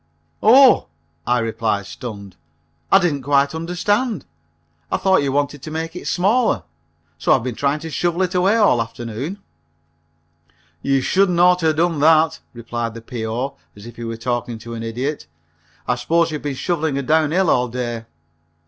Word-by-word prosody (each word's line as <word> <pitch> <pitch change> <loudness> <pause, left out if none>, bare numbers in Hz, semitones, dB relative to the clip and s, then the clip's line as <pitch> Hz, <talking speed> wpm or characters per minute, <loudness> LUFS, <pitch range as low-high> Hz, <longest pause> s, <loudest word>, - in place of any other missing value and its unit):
"Oh!" 260 +4 +6 0.4
I 120 0 +3
replied, 110 -3 -1
stunned, 100 -4 -8 0.6
"I - - +8
didn't 170 -7 0
quite 140 +1 +2
understand. 180 - -1 0.7
I - - +2
thought 190 -3 +3
you 140 -1 -1
wanted 145 0 -1
to 155 - -7
make 160 +2 -4
it 180 - -7
smaller, 200 - +2 0.6
so - - +3
I've 130 - +1
been 125 -1 -3
trying 140 +6 -1
to 160 0 -7
shovel 175 +3 0
it 185 0 -2
away 185 +4 +3
all 205 - +4
afternoon." 115 - -5 1.4
"You 135 +3 +1
shouldn't 185 +4 +2
oughter 180 -1 +4
have 155 - +2
done 165 -1 +1
that," 160 +1 +4
replied 120 -1 -5
the 115 - -8
P.O. 120 +3 -4 0.2
as 100 +1 -13
if 120 0 -11
he 120 - -7
were 115 0 -4
talking 120 0 -3
to 115 +1 -9
an 115 - -5
idiot, 125 - -4 0.6
"I 125 - +2
suppose 165 +7 +1
you've 150 - -4
been 145 -2 -3
shoveling 160 +1 -1
her 140 - -2
down 155 +2 +2
hill 180 +2 +2
all 125 0 +2
day?" 120 -1 -4
140 Hz, 170 wpm, -20 LUFS, 120-170 Hz, 1.4 s, I